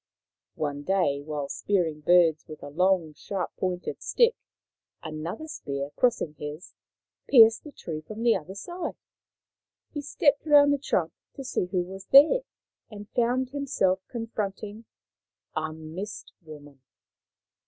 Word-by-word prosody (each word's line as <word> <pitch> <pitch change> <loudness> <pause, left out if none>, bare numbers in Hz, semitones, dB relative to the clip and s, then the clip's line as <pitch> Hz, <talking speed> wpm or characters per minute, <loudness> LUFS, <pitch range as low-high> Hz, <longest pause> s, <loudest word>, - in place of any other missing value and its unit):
One 145 -2 -3
day, 145 -5 +1
while 145 -1 -4
spearing 170 -3 -1
birds 165 -1 +4
with 155 -1 -10
a - - -7
long 180 -1 +2
sharp 190 +5 -5
pointed 180 -1 -3
stick, 470 -1 +3 0.7
another 160 - -5
spear, 140 - -5
crossing 235 -11 +1
his, 150 +4 -7 0.6
pierced 225 -3 +7
the 300 - -10
tree 160 - -6
from 215 +8 -7
the 235 -1 +5
other 185 +2 -6
side. 350 - -5 1.0
He 295 - -3
stepped 285 0 +2
round 290 -2 +6
the 285 - 0
trunk 175 - 0 0.2
to 275 - -7
see 255 - -1
who 180 -1 0
was 190 +1 -10
there, 300 - +7 0.5
and 205 -1 -10
found 250 +2 0
himself 255 -10 0
confronting 215 -2 -5 0.7
a 155 0 -2
Mist 160 +6 -8
woman. 145 -4 -13
190 Hz, 130 wpm, -27 LUFS, 155-240 Hz, 1.0 s, pierced